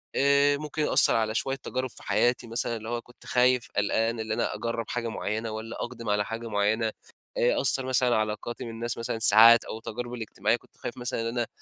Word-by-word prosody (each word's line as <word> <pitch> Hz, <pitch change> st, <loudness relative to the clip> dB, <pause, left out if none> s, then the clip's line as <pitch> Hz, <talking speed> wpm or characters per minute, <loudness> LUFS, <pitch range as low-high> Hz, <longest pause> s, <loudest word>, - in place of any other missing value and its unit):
آآ 140 Hz, +1 st, +4 dB
ممكن 150 Hz, +1 st, -4 dB
يأثر -, -, +4 dB
على 110 Hz, -1 st, 0 dB
شوية 135 Hz, +2 st, 0 dB
تجارب 130 Hz, -1 st, -4 dB
في -, -, -13 dB
حياتي 120 Hz, 0 st, +1 dB
مثلًا 115 Hz, 0 st, -2 dB
اللي 110 Hz, +1 st, -8 dB
هو 120 Hz, 0 st, -2 dB
كنت 125 Hz, -, -19 dB
خايف، 125 Hz, 0 st, +2 dB
قلقان، 110 Hz, +3 st, +1 dB
اللي 110 Hz, 0 st, -2 dB
أنا 110 Hz, -, -1 dB
أجرّب 115 Hz, +1 st, -3 dB
حاجة 120 Hz, -1 st, -2 dB
مُعيّنة 110 Hz, 0 st, -3 dB
والّا 110 Hz, +1 st, -6 dB
أُقدم 115 Hz, -3 st, -6 dB
على 105 Hz, 0 st, +1 dB
حاجة 115 Hz, +2 st, -5 dB
مُعيّنة. 110 Hz, +2 st, +1 dB, 0.5 s
آآ -, -, +2 dB
أثّر 135 Hz, -1 st, +1 dB
مثلًا 125 Hz, -2 st, +2 dB
علاقاتي 110 Hz, +2 st, -3 dB
من 115 Hz, -, -6 dB
الناس 115 Hz, +1 st, -4 dB
مثلًا 115 Hz, -1 st, -3 dB
ساعات 115 Hz, +2 st, +7 dB
أو 110 Hz, -, -6 dB
تجاربي 120 Hz, +2 st, -6 dB
الإجتماعية 110 Hz, -, 0 dB
كنت -, -, -26 dB
خايف 120 Hz, -, -6 dB
مثلًا 125 Hz, -2 st, -3 dB
إن 115 Hz, -, -2 dB
أنا 120 Hz, 0 st, -2 dB
115 Hz, 205 wpm, -27 LUFS, 110-125 Hz, 0.5 s, ساعات